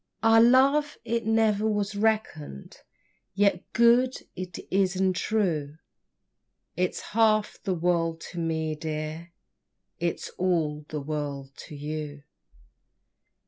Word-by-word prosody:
Our 225 0 +6
love 275 +5 +4
it 230 -1 -1
ne'er 220 -2 +2
was 210 -1 -1
reckon'd, 205 - -2 0.6
Yet 200 0 +1
good 240 +2 +4 0.2
it 180 -1 -6
is 190 -1 +2
and 185 0 +1
true, 170 -8 -1 1.0
It's 180 +1 -1
half 215 -1 +2
the 190 -3 -1
world 165 -1 0
to 175 - -6
me, 160 -1 -1
dear, 155 +2 -5 0.7
It's 170 0 -2
all 155 -5 0
the 150 -1 -4
world 140 -2 -4 0.2
to 155 - -9
you. 145 0 -5
180 Hz, 110 wpm, -27 LUFS, 155-220 Hz, 1.0 s, Our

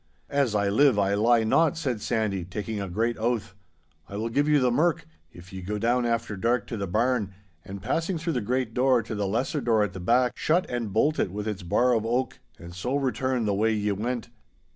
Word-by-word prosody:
'As 140 -6 +1
I 100 -1 +2
live 115 +4 +4
I 100 -1 +2
lie 115 +3 +3
not,' 160 +9 +2
said 130 -9 -2
Sandy, 105 -5 -1
taking 105 +4 -5
a 100 - -4
great 115 +6 -1
oath. 110 -3 -1 0.6
'I 100 - -6
will 110 +2 -2
give 145 +6 +1
you 150 -1 +5
the 125 -2 +2
merk, 155 +6 +1 0.3
if 90 +2 -14
ye 95 - -6
go 105 +4 -3
down 120 +3 +1
after 115 -2 -1
dark 115 +3 0
to - - -3
the 100 -1 -3
barn, 110 0 0 0.3
and 95 0 -9
passing 170 +2 -1
through 165 +1 -2
the 125 - -1
great 125 +1 -1
door 125 -1 +3
to 110 - -6
the 105 -2 -1
lesser 125 - -1
door 110 -4 +2
at 105 - -3
the 95 - -7
back, 120 +7 +2
shut 170 +4 +1
and 120 -4 -3
bolt 150 +10 +2
it 95 - 0
with 105 +2 -4
its 105 -2 -3
bar 120 +8 +2
of 110 -2 +1
oak, 120 +3 -1 0.2
and 85 0 -11
so 120 +9 -2
return 130 -3 0
the 105 - +1
way 110 +3 +2
ye 105 0 0
went. 115 +4 -3
115 Hz, 230 wpm, -26 LUFS, 100-125 Hz, 0.6 s, you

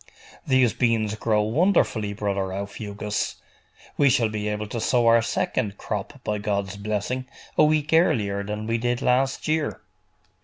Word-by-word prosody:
'These 130 -3 +4
beans 115 -4 +1
grow 110 -1 +1
wonderfully, 115 - +2
brother 100 -2 -2
Aufugus. 100 +1 -4 0.6
We 140 - +5
shall 120 -4 +3
be 105 -1 -3
able 105 0 -2
to 110 +3 -5
sow 120 0 +2
our 115 0 +6
second 105 -2 -1
crop, 110 +6 -5
by 105 0 -1
God's 100 -1 -2
blessing, 105 +5 -3 0.3
a - - +5
week 155 0 +2
earlier 105 - +3
than 105 +1 -4
we 115 +1 0
did 120 +1 -1
last 130 +2 +1
year. 155 -1 0
110 Hz, 150 wpm, -24 LUFS, 105-125 Hz, 0.6 s, our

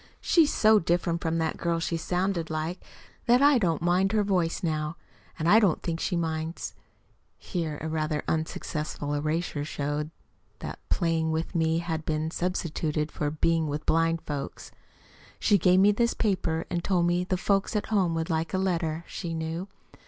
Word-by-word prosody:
She's 325 -4 +4
so 215 -1 +5
different 170 0 0
from 165 0 0
that 160 -1 -1
girl 170 -2 0
she 165 +1 -1
sounded 180 0 -1
like 160 +3 -3 0.4
that 240 +1 +6
I 285 -2 +6
don't 170 -6 0
mind 185 +3 +2
her 215 -1 +3
voice 185 -2 0
now. 155 0 -1 0.4
And 160 -1 -1
I 215 +5 +7
don't 195 -8 +2
think 165 -1 -2
she 180 - -1
minds 160 0 -3 0.6
(here 165 -5 -3
a - - -2
rather 155 -1 -1
unsuccessful 155 -2 -2
erasure 155 +1 -1
showed 145 0 -3 0.5
that - - -7
"playing 165 -2 +1
with 160 +3 -2
me" 160 -1 +2
had 165 -2 -2
been 155 0 -1
substituted 160 -4 -2
for 150 - -1
"being 160 +1 +1
with 150 +1 -4
blind 165 0 +2
folks"). 145 -2 -5 0.7
She 205 -2 +4
gave 180 +2 +5
me 200 +2 +6
this 235 +3 +1
paper, 185 -6 0
and 175 -1 -1
told 180 -3 +2
me 175 +1 +2
the 185 0 -1
folks 195 +2 +1
at 210 - 0
home 180 -5 +2
would 165 +1 -2
like 160 +3 -1
a - - +2
letter, 170 -4 -1
she 170 -3 -5
knew. 165 +3 -3
165 Hz, 175 wpm, -27 LUFS, 160-185 Hz, 0.7 s, I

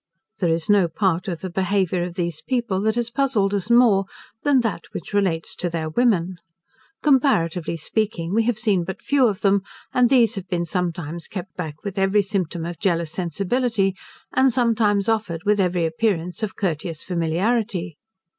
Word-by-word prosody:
There 175 - +1
is 165 0 0
no 205 -4 +4
part 180 +1 0
of 175 -4 -4
the 185 - -4
behaviour 185 -1 0
of 175 0 -4
these 170 -4 -3
people, 235 -7 -1
that 220 +1 +1
has 240 0 -1
puzzled 235 -6 +1
us 200 +1 -2
more, 235 -5 +5 0.4
than 280 -3 +3
that 225 -7 -3
which 170 - -7
relates 185 -5 0
to 175 - -1
their 165 -2 -3
women. 185 -5 +1 0.7
Comparatively 180 - +2
speaking 180 0 -2
we 225 - +4
have 240 -2 +1
seen 210 -6 +1
but 190 +2 -7
few 275 -3 +3
of 210 -2 -2
them, 200 0 +3 0.3
and 250 -1 +4
those 245 -4 +4
have 195 -5 -6
been 170 -1 -1
sometimes 170 -1 -3
kept 190 -1 -7
back 155 -4 -6
with 200 -1 -4
every 195 +2 +3
symptom 180 -4 -2
of 170 0 -6
jealous 170 -5 0
sensibility; 195 - 0 0.4
and 260 0 +4
sometimes 225 -4 +2
offered 205 -7 -1
with 210 0 +3
every 180 -3 +1
appearance 175 +1 -1
of 215 -3 -3
courteous 165 -3 -3
familiarity. 180 +1 -1
195 Hz, 175 wpm, -22 LUFS, 170-220 Hz, 0.7 s, more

